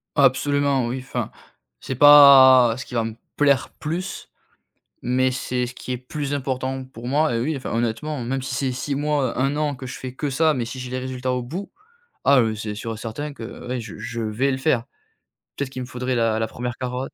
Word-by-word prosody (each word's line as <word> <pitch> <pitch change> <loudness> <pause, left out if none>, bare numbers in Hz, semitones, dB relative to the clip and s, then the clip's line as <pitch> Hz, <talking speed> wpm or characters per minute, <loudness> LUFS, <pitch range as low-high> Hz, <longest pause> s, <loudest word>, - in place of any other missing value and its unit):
Absolument 140 -1 +2
oui, 130 +2 -3
enfin 130 - -4 0.5
c'est 130 - -5
pas 135 -4 +8
ce 130 - -7
qui 125 - -9
va 115 - +1
me 110 -1 -5 0.2
plaire 140 -2 +3
plus, 175 +5 -4 0.7
mais 130 +1 +1
c'est 125 -1 -2
ce 120 - -9
qui 130 - -6
est 125 - -2
plus 140 +3 -5
important 130 -1 -2
pour 120 -2 -10
moi, 150 0 +2
et 115 - 0
oui, 150 +6 -1
enfin, 135 - -5
honnêtement, 120 +5 -2
même 135 +2 -2
si 130 - -5
c'est 130 +1 -1
6 140 +2 -3
mois, 145 -4 0
1 135 +2 +1
an 150 -1 0
que 130 0 -9
je 130 - -6
fais 130 -1 -7
que 145 +2 -3
ça, 155 +4 +2
mais 125 -4 -2
si 130 +3 -7
j'ai 125 0 -6
les 130 - -2
résultats 130 0 -3
au 125 0 -1
bout. 175 +11 -6 0.6
Ah, 140 -2 +6
heu, 110 -2 +1
c'est 105 -1 -5
sûr 115 +1 -5
certain 130 +7 -5
que 115 -4 -9
ouais, 125 0 -2
je 110 -3 -9
je 115 +2 -5
vais 110 +6 0
le - - -1
faire. 130 -4 +1 0.7
Peut-être 140 -2 -3
qu'il 130 - -6
me 125 - -6
faudrait 125 0 -3
la 115 -2 +1
la 110 0 0
1re 120 +1 -5
carotte. 125 +1 -4
130 Hz, 220 wpm, -23 LUFS, 120-140 Hz, 0.7 s, pas